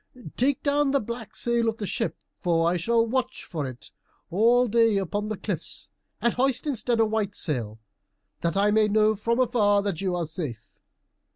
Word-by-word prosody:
Take 265 +2 +1
down 290 0 +2
the 280 0 +2
black 235 -1 -7
sail 235 -1 +1
of 220 - -4
the 210 - -4
ship, 225 +3 -2 0.2
for 165 -2 +2
I 175 - +2
shall 230 +6 +2
watch 255 +2 -2
for 150 -5 -4
it 125 -1 -10 0.4
all 235 +6 +4
day 230 -1 +3
upon 205 +2 -2
the 215 -1 -3
cliffs, 185 -6 -5 0.3
and 235 - +1
hoist 260 +1 +1
instead 245 -4 0
a 225 - +5
white 215 -2 -1
sail, 115 - -2 0.6
that 170 +1 -1
I 205 +1 +3
may 215 0 +4
know 215 +1 +3
afar 230 +3 -1
off 205 -5 +3
that 195 -5 -2
you 185 -2 0
are 175 -1 -1
safe." 150 - -6
215 Hz, 185 wpm, -26 LUFS, 180-235 Hz, 0.6 s, a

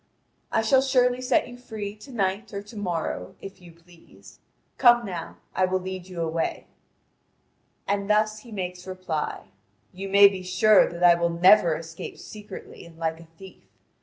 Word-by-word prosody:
I 225 - +1
shall 260 +4 +4
surely 255 -2 +2
set 255 +1 +1
you 245 - -10
free 210 -4 -6
to 265 +6 -13
night 200 -1 -2
or 200 - -4
to 210 +3 -14
morrow, 170 - -4
if 195 -1 -11
you 175 -1 -14
please. 170 0 -19 0.4
Come 240 -2 +6
now, 180 -4 -6 0.2
I 185 - +3
will 185 0 0
lead 185 0 -7
you 180 -2 -6
away." 165 0 -2 1.2
And 200 0 0
he 200 - -8
thus 215 0 +1
makes 180 -5 -6
reply: 185 -5 -4 0.4
"You 195 +2 -6
may 200 +1 +8
be 195 -2 -3
sure 190 +3 +4
that 175 +1 -5
I 175 -1 +8
will 170 0 0
never 175 0 +5
escape 165 +1 -8
secretly 210 -2 -11
and 170 -1 -15
like 160 -1 -2
a 165 - -14
thief. 190 +1 -14
190 Hz, 170 wpm, -25 LUFS, 175-215 Hz, 1.2 s, may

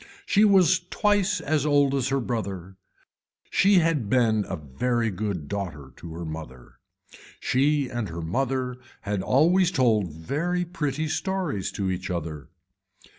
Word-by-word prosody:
She 210 - +4
was 185 -4 +5
twice 205 -1 +2
as 150 -1 0
old 145 -2 +3
as 135 -2 0
her 135 0 +1
brother. 100 -7 -4 0.8
She 200 +1 +4
had 160 - +2
been 110 -4 +2
a 95 - -2
very 115 - -1
good 95 -6 -3
daughter 85 -8 -5
to 85 -1 -9
her 85 0 -5
mother. 80 -6 -9 0.6
She 140 +2 +2
and 120 -5 -4
her 85 0 -6
mother 130 +7 -1 0.2
had 100 -1 -2
always 170 - +3
told 110 - +2
very 155 - -2
pretty 155 -3 -2
stories 160 - -2
to 95 -2 -1
each 90 +1 -4
other. 80 -5 -5
125 Hz, 140 wpm, -25 LUFS, 95-150 Hz, 0.8 s, was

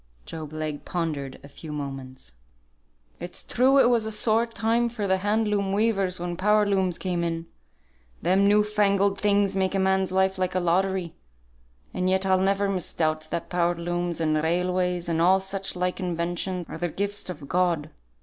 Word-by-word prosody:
Job 155 - -7
Legh 155 -1 -4
pondered 150 -6 -3
a - - -10
few 150 +2 -10
moments. 135 -3 -7 0.9
"It's 175 +1 -5
true 260 +3 +3
it 270 - +6
was 235 -3 +2
a - - -3
sore 220 +2 +2
time 230 +1 0
for 225 -3 -4
the 190 -1 +2
hand 210 +3 0
loom 200 -2 0
weavers 195 -4 +1
when 175 0 -3
power 210 +2 +3
looms 190 -3 +1
came 180 -2 -2
in: 165 -1 -2 0.7
them 190 +4 +3
new 210 +1 +5
fangled 200 -1 +1
things 200 -1 +2
make 190 0 0
a - - +1
man's 190 0 +1
life 190 0 +1
like 185 0 -1
a - - +3
lottery; 185 0 0 0.8
and 185 0 0
yet 190 +1 +2
I'll 190 -1 +3
never 195 +1 +1
misdoubt 155 -4 -1
that 170 - -3
power 175 -1 +1
looms, 175 0 -2
and 155 -1 +1
railways, 180 +1 0
and 165 -1 0
all 185 +3 +5
such 195 0 -3
like 180 +1 -1
inventions, 175 0 -2
are 160 - -7
the 175 0 -1
gifts 200 +2 -3
of 155 -6 -7
God. 170 -3 0
185 Hz, 180 wpm, -25 LUFS, 170-200 Hz, 0.9 s, it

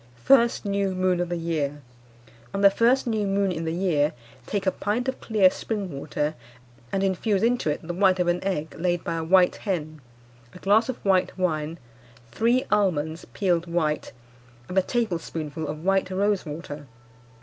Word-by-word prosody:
"First 235 -4 +4
New 200 -1 0
Moon 185 -1 +1
of 175 -1 -1
the 175 - -2
year. 150 -4 -2 0.7
On 195 - -1
the 200 -1 +7
first 240 +6 +3
new 220 -4 0
moon 195 0 +1
in 165 -1 -3
the 160 - -1
year 165 -4 +1 0.3
take 200 -2 -2
a 190 - +3
pint 225 +7 -2
of 260 - -3
clear 205 -5 +4
spring 205 -5 -4
water, 150 +2 -2 0.6
and 195 - 0
infuse 195 +2 +1
into 240 -8 +2
it 150 +2 -3
the 175 - -2
white 185 0 +3
of 180 - +1
an 175 +1 0
egg 160 -5 -2
laid 175 0 0
by - - -2
a 165 - -2
white 180 +2 +4
hen, 155 -6 -4 0.5
a - - -8
glass 210 +6 +3
of 255 - -2
white 190 -1 +2
wine, 160 -3 -1 0.5
three 235 - +2
almonds 165 -6 +1
peeled 175 -3 0
white, 160 -3 -1 0.6
and 180 - -6
a 190 - +5
tablespoonful 165 - -3
of 155 +2 -6
white 195 -1 +2
rose 195 -1 0
water. 145 -1 -7
185 Hz, 175 wpm, -25 LUFS, 160-200 Hz, 0.7 s, the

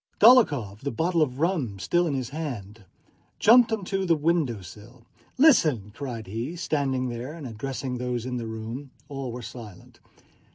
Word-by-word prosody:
Dólokhov, 145 - +5
the 140 - -3
bottle 165 +7 0
of 135 -3 0
rum 155 - 0
still 175 - +1
in 145 - -1
his 130 -3 -3
hand, 115 -9 -6 0.5
jumped 235 +1 +6
onto 195 -2 -1
the 170 -3 +3
window 150 - 0
sill. 115 +6 -13 0.3
"Listen!" 155 - +4
cried 120 -4 -6
he, 115 - -4
standing 135 -7 -1
there 120 +5 -5
and 160 -4 -9
addressing 130 +2 -4
those 125 -1 -2
in 125 -1 -3
the 115 -2 -4
room. 110 +5 -6 0.2
All 135 -3 -5
were 120 +1 -7
silent. 110 -5 -11
130 Hz, 160 wpm, -26 LUFS, 115-160 Hz, 0.5 s, jumped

